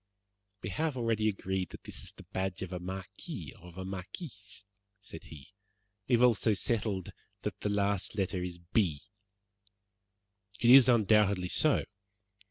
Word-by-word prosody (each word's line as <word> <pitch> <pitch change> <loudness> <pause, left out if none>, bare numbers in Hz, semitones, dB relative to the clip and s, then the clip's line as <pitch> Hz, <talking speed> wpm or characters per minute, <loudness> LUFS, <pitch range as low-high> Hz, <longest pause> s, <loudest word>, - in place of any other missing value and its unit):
"We 90 - -3
have 155 - -1
already 115 -2 +1
agreed 95 -2 -2
that - - -11
this - - -8
is - - -6
the - - -14
badge 95 0 -2
of 95 0 -6
a 90 - -3
marquis 95 +1 -7
or 90 - -13
of 90 0 -13
a 95 - -5
marquise," 105 - -8 0.3
said 95 -6 -10
he. 75 +6 -12 0.5
"We 125 - +4
have 120 - +3
also 110 -3 +4
settled 105 -4 -1 0.3
that - - -3
the 105 - -1
last 100 0 0
letter 95 -1 0
is 90 -1 -4
B." 85 -3 0 1.6
"It 120 0 +5
is 130 -1 +10
undoubtedly 105 -5 +4
so." 155 +8 +3
100 Hz, 155 wpm, -31 LUFS, 90-110 Hz, 1.6 s, is